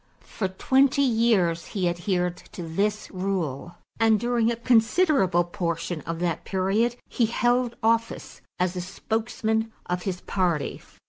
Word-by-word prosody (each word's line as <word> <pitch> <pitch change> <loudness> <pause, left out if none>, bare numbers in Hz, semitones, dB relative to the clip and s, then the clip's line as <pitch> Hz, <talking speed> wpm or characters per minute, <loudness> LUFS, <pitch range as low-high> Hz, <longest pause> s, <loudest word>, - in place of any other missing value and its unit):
For 195 - -3
twenty 265 +8 +3
years 220 -9 +2
he 185 -2 +1
adhered 180 0 -1 0.2
to 175 - -6
this 205 +6 -1
rule 180 -5 -3 0.2
and 225 -1 +4
during 235 0 +1
a - - -1
considerable 230 - +3
portion 170 -3 -3
of 165 0 -2
that 170 -1 -1
period 200 +5 +1
he 235 - +1
held 240 +1 +1
office 230 +1 0 0.2
as 180 0 0
a 180 - -2
spokesman 220 +3 -2
of 180 0 -2
his 180 -1 -4
party. 175 -6 -1
195 Hz, 135 wpm, -25 LUFS, 175-230 Hz, 0.2 s, and